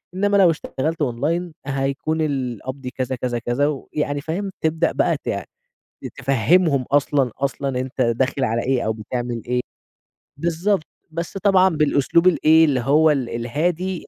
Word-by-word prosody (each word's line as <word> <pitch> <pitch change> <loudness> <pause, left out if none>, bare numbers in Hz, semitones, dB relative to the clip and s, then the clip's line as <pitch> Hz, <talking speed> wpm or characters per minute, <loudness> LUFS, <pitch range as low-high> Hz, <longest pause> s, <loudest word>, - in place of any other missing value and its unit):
إنّما 205 +1 +2
لو 185 -3 +6
اشتغلت 155 +1 -3
أونلاين 155 +7 -1
هيكون 140 +3 -1
القبض 130 -2 -3
كذا، 130 +1 -3
كذا، 120 -1 -2
كذا 125 +5 0
ويعني 145 0 -3
فاهم؟ 190 +6 -3
تبدأ 160 +1 +1
بقى - - +1
ت - - -7 0.9
تفهمهم 140 +3 +2
أصلًا 140 -3 +2
أصلًا 135 -1 -2
أنت 130 +1 -5
داخل 130 +3 0
على 115 -1 0
إيه 130 -1 0
أو 110 - +1
بتعمل 120 +1 -4
إيه. 125 0 0 0.8
بالضبط 170 +3 0 0.2
بس 170 +4 -5
طبعًا 190 -1 +4
بالأسلوب 155 +1 +2
الإيه 160 -2 +5
اللي 135 -4 +1
هو 150 +5 +4
ال 130 -5 -1
الهادي. 165 +10 -2
140 Hz, 140 wpm, -21 LUFS, 125-165 Hz, 0.9 s, لو